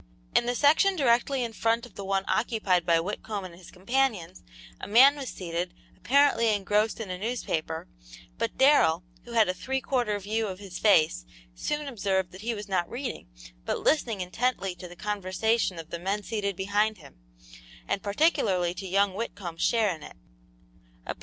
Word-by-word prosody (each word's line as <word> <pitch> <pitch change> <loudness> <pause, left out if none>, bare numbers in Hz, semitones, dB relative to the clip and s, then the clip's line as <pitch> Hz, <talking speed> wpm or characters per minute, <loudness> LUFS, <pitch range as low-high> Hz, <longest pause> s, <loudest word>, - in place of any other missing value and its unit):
In 240 - +4
the 245 - 0
section 315 +9 +4
directly 260 -2 +2
in 230 -1 -4
front 230 +2 0
of 245 - -16
the 200 - -7
one 195 0 -1
occupied 205 -7 +1
by 165 -1 +4
Whitcomb 200 +2 -4
and 180 - -9
his 175 0 -14
companions 195 -3 -1 0.4
a - - -6
man 260 +7 +7
was 275 -3 -5
seated, 175 0 -4 0.2
apparently 255 -4 +3
engrossed 210 +3 0
in 210 -5 -5
a 180 - -5
newspaper, 175 -8 -3 0.5
but - - -2
Darrell, 265 - +4 0.2
who 240 - -10
had 225 -2 +4
a 185 - 0
three 260 +9 -2
quarter 245 -6 0
view 215 +3 -2
of 190 -2 -5
his 195 -2 -8
face, 160 - +4 0.3
soon 295 - -3
observed 195 -7 -1
that 185 - -11
he 230 +1 -2
was 210 -1 -7
not 185 -3 0
reading, 245 - -5 0.4
but - - -1
listening 230 -10 +1
intently 195 +1 -1
to 180 0 -10
the 175 - -12
conversation 210 +1 -1
of 165 -1 -9
the 170 - -4
men 195 +4 -2
seated 200 -2 -2
behind 205 +3 0
him, 145 - -16 0.7
and 195 - -1
particularly 200 - +1
to 190 +2 -7
young 195 +1 +2
Whitcomb's 195 -5 -5
share 220 -5 +2
in 160 - -11
it. - - -11
205 Hz, 175 wpm, -27 LUFS, 185-235 Hz, 0.7 s, man